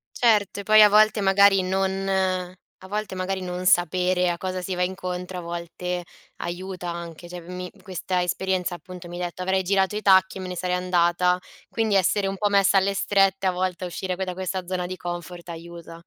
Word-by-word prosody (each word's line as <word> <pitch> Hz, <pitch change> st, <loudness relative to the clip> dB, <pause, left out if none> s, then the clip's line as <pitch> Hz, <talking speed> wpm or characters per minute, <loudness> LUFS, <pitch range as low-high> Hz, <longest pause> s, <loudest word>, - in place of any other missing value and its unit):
Cert 215 Hz, -5 st, +2 dB
e 200 Hz, -, -4 dB
poi 215 Hz, +1 st, +7 dB
a 210 Hz, -, +8 dB
volte 215 Hz, 0 st, +4 dB
magari 195 Hz, 0 st, +5 dB
non 190 Hz, +1 st, -1 dB, 0.7 s
a 190 Hz, -, -11 dB
volte 210 Hz, 0 st, -3 dB
magari 190 Hz, +1 st, -2 dB
non 180 Hz, 0 st, -5 dB
sapere 180 Hz, +1 st, +3 dB
a 170 Hz, -, -1 dB
cosa 185 Hz, 0 st, -4 dB
si 185 Hz, +1 st, -4 dB
va 180 Hz, 0 st, 0 dB
incontro, 180 Hz, 0 st, -4 dB
a -, -, -6 dB
volte 175 Hz, +1 st, -5 dB, 0.3 s
aiuta 180 Hz, +1 st, -5 dB
anche. 170 Hz, 0 st, -7 dB
Cioè 175 Hz, 0 st, -8 dB
mi 180 Hz, +1 st, -7 dB
questa 185 Hz, -1 st, -2 dB
esperienza 180 Hz, 0 st, -1 dB
appunto 180 Hz, 0 st, -10 dB
mi 175 Hz, -, -7 dB
detto: 175 Hz, 0 st, -5 dB
"Avrei 190 Hz, +1 st, +1 dB
girato 195 Hz, +1 st, +1 dB
i -, -, -3 dB
tacchi 190 Hz, -1 st, +4 dB
e -, -, -6 dB
me 185 Hz, -, -5 dB
ne 180 Hz, -, -5 dB
sarei 180 Hz, +1 st, -1 dB
andata." 180 Hz, 0 st, +2 dB, 0.3 s
Quindi 220 Hz, -3 st, 0 dB
essere 195 Hz, +1 st, +2 dB
un 195 Hz, 0 st, -3 dB
po' 210 Hz, -, +1 dB
messa 200 Hz, 0 st, +4 dB
alle 195 Hz, +1 st, +2 dB
strette 195 Hz, -1 st, +2 dB
a -, -, +3 dB
volte, 185 Hz, 0 st, -2 dB
a -, -, -2 dB
uscire 180 Hz, +1 st, -4 dB
que 190 Hz, -, -3 dB
da 180 Hz, -, -4 dB
questa 185 Hz, 0 st, -4 dB
zona 180 Hz, 0 st, -2 dB
di 185 Hz, +1 st, -5 dB
comfort 175 Hz, 0 st, -7 dB
aiuta. 170 Hz, 0 st, -9 dB
185 Hz, 205 wpm, -24 LUFS, 180-195 Hz, 0.7 s, a